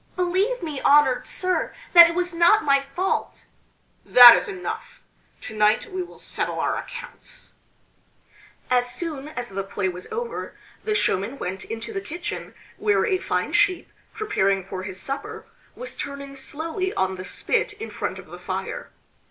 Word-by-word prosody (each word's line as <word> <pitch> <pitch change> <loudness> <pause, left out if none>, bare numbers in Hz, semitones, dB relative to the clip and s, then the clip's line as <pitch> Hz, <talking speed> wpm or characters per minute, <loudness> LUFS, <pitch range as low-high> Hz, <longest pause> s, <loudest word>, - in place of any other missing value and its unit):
"Believe 375 +6 0
me, 300 -5 -4
honored 270 -3 +4
sir, 365 -1 -1 0.2
that 340 -1 +10
it 335 - -4
was 360 0 -1
not 340 +5 +5
my 275 -1 +4
fault!" 375 +2 -2 0.6
"That 245 -1 +10
is - - -1
enough! 380 -3 -6 0.4
To 220 - -8
night 215 - +2
we 370 0 -3
will 355 - -9
settle - - -3
our - - 0
accounts." 485 - -8 1.2
As 245 0 +3
soon 300 -2 -4
as 245 -5 -6
the 195 0 -3
play 195 0 -2
was 180 0 -7
over 470 +1 -5 0.3
the 430 -1 0
showman 225 - 0
went 190 -2 -5
into 225 - -6
the 390 - -3
kitchen 345 -1 -6 0.2
where 420 -1 +2
a 380 -5 +1
fine - - -2
sheep, 410 -4 +2 0.2
preparing 195 - 0
for 190 -1 -6
his 190 0 -5
supper, 275 +7 -5 0.3
was - - -7
turning 280 -1 -6
slowly 325 +7 -3
on 190 0 0
the 185 - -6
spit 415 - -1
in 425 +2 -8
front - - -4
of - - -10
the - - -11
fire. - - -5
305 Hz, 160 wpm, -24 LUFS, 230-375 Hz, 1.2 s, that